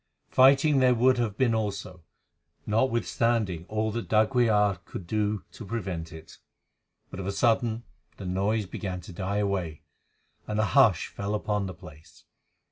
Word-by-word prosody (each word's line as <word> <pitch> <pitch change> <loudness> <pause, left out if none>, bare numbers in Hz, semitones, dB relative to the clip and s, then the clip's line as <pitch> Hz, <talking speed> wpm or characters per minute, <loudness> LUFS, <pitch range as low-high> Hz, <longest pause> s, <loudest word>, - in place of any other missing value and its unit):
Fighting 135 +2 +5
there 125 -1 +4
would 125 +1 +3
have 110 -4 -1
been 125 -3 +2
also, 100 -5 -3 0.6
notwithstanding 115 -5 0
all 110 0 -1
that 115 +1 -4
d'Aguilar 110 -3 +3
could 90 - -9
do 105 0 -1
to - - -10
prevent 95 -7 -4
it; 80 -1 -12 0.7
but 95 - -7
of 95 - -4
a - - 0
sudden 115 +1 +1 0.3
the 100 - -8
noise 100 +4 0
began 95 0 -5
to 90 - -11
die 95 +3 -3
away, 95 -7 -2 0.6
and 105 0 -2
a 110 - +3
hush - - +4
fell 100 +1 -3
upon 105 -1 -1
the 95 - -7
place. 80 -1 -15
105 Hz, 150 wpm, -27 LUFS, 95-115 Hz, 0.7 s, Fighting